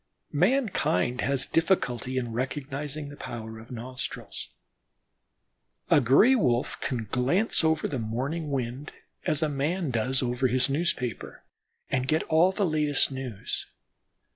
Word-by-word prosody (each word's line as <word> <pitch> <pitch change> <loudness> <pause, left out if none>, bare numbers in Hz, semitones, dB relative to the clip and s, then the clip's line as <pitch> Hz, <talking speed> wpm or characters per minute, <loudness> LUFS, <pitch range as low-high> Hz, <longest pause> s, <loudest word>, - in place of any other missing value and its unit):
Mankind 175 - +1
has 135 0 +1
difficulty 130 -7 0
in 120 -3 -2
recognizing 140 +3 -4
the 145 - -10
power 110 -4 -7
of 115 - -13
nostrils. 125 +1 -3 1.4
A 145 - +6
Gray 140 - +6
wolf 125 - +1
can 120 -4 -2
glance 165 - +1
over 160 -1 +2
the 135 - -3
morning 135 +9 -3
wind 130 +1 -3 0.3
as 155 +1 +2
a - - +3
man 150 +3 -1
does 125 +3 0
over 125 +1 +1
his 130 +2 +2
newspaper, 135 - -2 0.5
and 130 -1 0
get 155 +3 +2
all 165 +4 +4
the 200 +1 0
latest 150 -4 +3
news. 130 -6 -4
135 Hz, 130 wpm, -27 LUFS, 125-155 Hz, 1.4 s, A